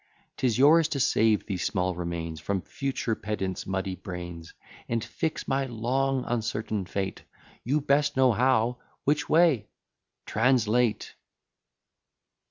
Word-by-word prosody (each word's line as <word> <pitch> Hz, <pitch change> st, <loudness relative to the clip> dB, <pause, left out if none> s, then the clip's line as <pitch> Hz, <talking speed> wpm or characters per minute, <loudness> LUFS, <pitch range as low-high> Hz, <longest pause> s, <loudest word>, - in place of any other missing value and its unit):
'Tis 120 Hz, -4 st, +1 dB
yours 155 Hz, +4 st, +6 dB
to 145 Hz, -, -3 dB
save 110 Hz, -3 st, +3 dB
these 95 Hz, -4 st, -3 dB
small 90 Hz, -2 st, 0 dB
remains 85 Hz, -2 st, -4 dB
From 95 Hz, +4 st, -2 dB
future 135 Hz, -5 st, -2 dB
pedant's 95 Hz, -3 st, -4 dB
muddy 95 Hz, 0 st, -2 dB
brains, 90 Hz, -2 st, -7 dB, 0.4 s
And 115 Hz, -1 st, 0 dB
fix 160 Hz, -, -3 dB
my 135 Hz, 0 st, 0 dB
long 130 Hz, +3 st, 0 dB
uncertain 110 Hz, -4 st, -2 dB
fate, 95 Hz, -1 st, -3 dB, 0.4 s
You 145 Hz, +5 st, +1 dB
best 140 Hz, 0 st, +2 dB
know 130 Hz, -1 st, +5 dB
how 125 Hz, 0 st, +2 dB, 0.2 s
"which 150 Hz, +2 st, +1 dB
way?" 155 Hz, -10 st, +4 dB, 0.6 s
TRANSLATE. 120 Hz, -1 st, +1 dB
115 Hz, 120 wpm, -27 LUFS, 95-135 Hz, 0.6 s, yours